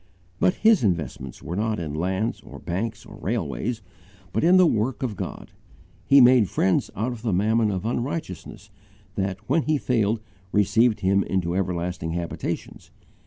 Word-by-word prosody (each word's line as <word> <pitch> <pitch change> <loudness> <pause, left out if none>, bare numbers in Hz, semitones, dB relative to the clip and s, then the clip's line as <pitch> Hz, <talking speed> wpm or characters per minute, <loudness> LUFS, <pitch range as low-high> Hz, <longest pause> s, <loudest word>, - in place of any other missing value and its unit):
But 185 - +3
his 220 - +4
investments 85 - -2
were 85 - -4
not 110 +2 0
in 80 -4 -4
lands 95 +8 -1
or - - -11
banks 105 +5 -4
or - - -12
railways, 115 -4 -3 0.5
but - - 0
in 175 +3 +6
the 185 - +7
work 125 -2 0
of 115 -5 -2
God. - - -6 0.6
He 140 0 +7
made 125 -5 +6
friends 95 - +1
out 110 +6 -1
of 120 -3 -7
the 115 -2 -1
mammon 110 +4 +2
of 95 0 -3
unrighteousness 120 - -4 0.4
that 95 -1 -2
when 165 - +3
he 155 0 +1
failed 115 -5 +1 0.3
received 105 +2 +3
him 100 0 +3
into 90 -3 -1
everlasting 90 -3 -2
habitations. 85 0 -5
105 Hz, 160 wpm, -24 LUFS, 95-120 Hz, 0.6 s, the